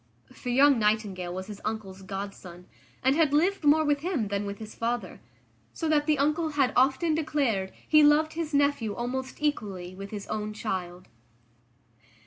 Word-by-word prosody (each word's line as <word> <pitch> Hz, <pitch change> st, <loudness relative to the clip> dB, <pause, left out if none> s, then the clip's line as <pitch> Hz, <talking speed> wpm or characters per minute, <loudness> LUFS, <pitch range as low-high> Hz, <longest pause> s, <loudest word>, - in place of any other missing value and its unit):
For 250 Hz, -, -7 dB
young 270 Hz, +1 st, +5 dB
Nightingale 210 Hz, -4 st, 0 dB
was 185 Hz, +1 st, -5 dB
his 205 Hz, 0 st, -9 dB
uncle's 205 Hz, -3 st, -5 dB
godson, 190 Hz, -2 st, -7 dB, 0.4 s
and 265 Hz, +2 st, +4 dB
had 305 Hz, -3 st, +3 dB
lived 360 Hz, +4 st, +2 dB
more 305 Hz, +2 st, +5 dB
with 290 Hz, -1 st, +2 dB
him 295 Hz, -, -2 dB
than 200 Hz, 0 st, -2 dB
with 200 Hz, 0 st, -5 dB
his 215 Hz, 0 st, -9 dB
father. 235 Hz, +1 st, -3 dB, 0.5 s
So 325 Hz, -, -3 dB
that 295 Hz, -1 st, +2 dB
the 305 Hz, -1 st, +3 dB
uncle 305 Hz, +3 st, +1 dB
had 275 Hz, -3 st, +2 dB
often 270 Hz, +5 st, +3 dB
declared 275 Hz, -11 st, 0 dB, 0.2 s
he 305 Hz, -1 st, +6 dB
loved 300 Hz, +2 st, +4 dB
his 325 Hz, -1 st, -3 dB
nephew 285 Hz, -7 st, +1 dB
almost 260 Hz, +2 st, -4 dB
equally 195 Hz, -11 st, -2 dB
with 195 Hz, +1 st, -8 dB
his 205 Hz, -1 st, -6 dB
own 215 Hz, 0 st, -4 dB
child. 185 Hz, -4 st, -4 dB
240 Hz, 165 wpm, -27 LUFS, 200-295 Hz, 0.5 s, he